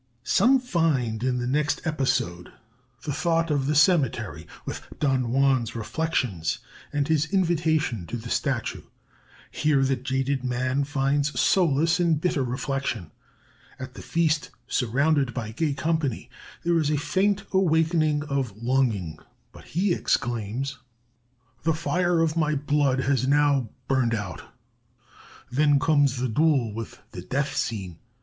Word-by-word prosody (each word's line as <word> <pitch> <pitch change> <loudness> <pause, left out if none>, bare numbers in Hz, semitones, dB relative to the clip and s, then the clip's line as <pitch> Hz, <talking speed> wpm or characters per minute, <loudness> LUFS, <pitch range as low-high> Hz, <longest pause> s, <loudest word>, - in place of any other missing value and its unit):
Some 265 +3 +4
find 155 - 0
in 130 -1 +1
the 120 - -2
next 145 +4 0
episode 130 - -1 0.5
the 145 - -3
thought 165 +1 +1
of 140 -2 0
the 150 - +1
cemetery, 125 - +2 0.2
with - - -5 0.2
Don 135 -3 +1
Juan's 130 -1 +2
reflections 115 - -1 0.3
and 145 -1 0
his 160 -1 +2
invitation 160 - +1
to 120 - -4
the 115 0 -8
Statue. 135 -5 -1 0.7
Here 150 -3 +2
the 135 0 +2
jaded 130 +1 -1
man 130 +2 0
finds 145 +1 0
solace 165 -1 +3
in 170 -2 +3
bitter 155 -2 0
reflection. 130 - -3 0.7
At - - -8
the - - -9
feast, 160 -2 0 0.2
surrounded 135 +2 +1
by 110 -4 -4
gay 145 +4 -1
company, 155 -4 -1 0.3
there 170 0 +2
is 150 -2 +1
a 150 - +1
faint 195 +6 +1
awakening 160 -4 +2
of 135 -8 -2
longing, 115 -10 0 0.3
but - - -14
he 180 +3 0
exclaims: 120 0 -1 0.8
"'The 160 -1 +1
fire 175 +1 +1
of 160 -1 +1
my 155 -2 +1
blood 145 -2 +1
has 130 -1 +1
now 140 -4 +3 0.2
burned 130 -4 +2
out.' 95 -7 -5 1.1
"Then 145 +2 +4
comes 145 -2 +3
the 130 +1 0
duel, 130 -3 +2
with 115 0 -7
the - - -7
death 140 +2 -2
scene. 95 -7 -3
140 Hz, 135 wpm, -25 LUFS, 125-160 Hz, 1.1 s, Some